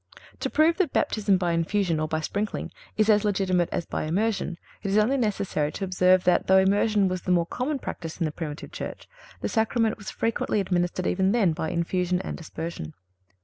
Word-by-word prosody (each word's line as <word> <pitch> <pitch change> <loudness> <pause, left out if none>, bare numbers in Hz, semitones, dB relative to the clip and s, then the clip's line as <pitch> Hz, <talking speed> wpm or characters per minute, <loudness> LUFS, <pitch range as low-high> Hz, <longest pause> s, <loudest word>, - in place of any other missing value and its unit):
To - - -2
prove 320 +2 +3
that 360 -8 +1
Baptism 205 -3 +2
by 175 -2 0
infusion 170 0 +1
or 155 - 0
by 160 0 -1
sprinkling 205 +6 -3 0.3
is 215 -1 +3
as 210 -1 +4
legitimate 190 -4 +1
as 170 - -2
by - - -3
immersion, 190 +1 -1 0.2
it 195 - -3
is 200 - +2
only 220 +6 +3
necessary 200 - 0
to - - -5
observe 185 0 +3
that, 180 -1 +2
though 190 - +6
immersion 200 +1 +3
was 185 -1 -2
the 180 - -2
more 175 -1 +3
common 260 - -2
practice 165 -10 -6
in 170 - +1
the 155 - -1
Primitive 150 -1 -6
Church, - - -7 0.3
the - - -1
Sacrament 225 0 +1
was 205 - -7
frequently 225 -2 -1
administered 180 -1 0
even 190 +2 +2
then 200 -9 +3
by 160 0 -3
infusion 180 +1 0
and - - -6
aspersion. 160 - -6
190 Hz, 195 wpm, -26 LUFS, 170-210 Hz, 0.3 s, though